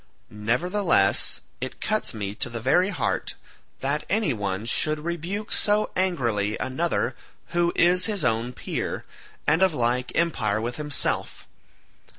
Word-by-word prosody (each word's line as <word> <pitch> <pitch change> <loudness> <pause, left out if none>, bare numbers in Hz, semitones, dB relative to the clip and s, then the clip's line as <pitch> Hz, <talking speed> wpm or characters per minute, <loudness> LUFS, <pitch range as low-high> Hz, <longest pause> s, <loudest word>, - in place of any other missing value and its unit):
Nevertheless 125 - +2 0.2
it 130 - -5
cuts 215 0 +1
me 100 -4 -4
to 125 - -2
the 120 0 -4
very 160 - +3
heart 185 - -1 0.5
that 140 +3 0
any 205 - +2
one 100 -1 -3
should 155 +6 +1
rebuke 175 +6 -3
so 210 0 +2
angrily 120 - +1
another 160 +6 -1 0.3
who 170 0 +2
is 180 +3 +4
his 210 -3 0
own 115 +1 +1
peer, 125 - -4 0.4
and 160 +4 +3
of 190 -4 +4
like 125 0 0
empire 120 -11 +1
with 120 +2 -3
himself. 150 -2 -1
150 Hz, 135 wpm, -25 LUFS, 115-180 Hz, 0.5 s, is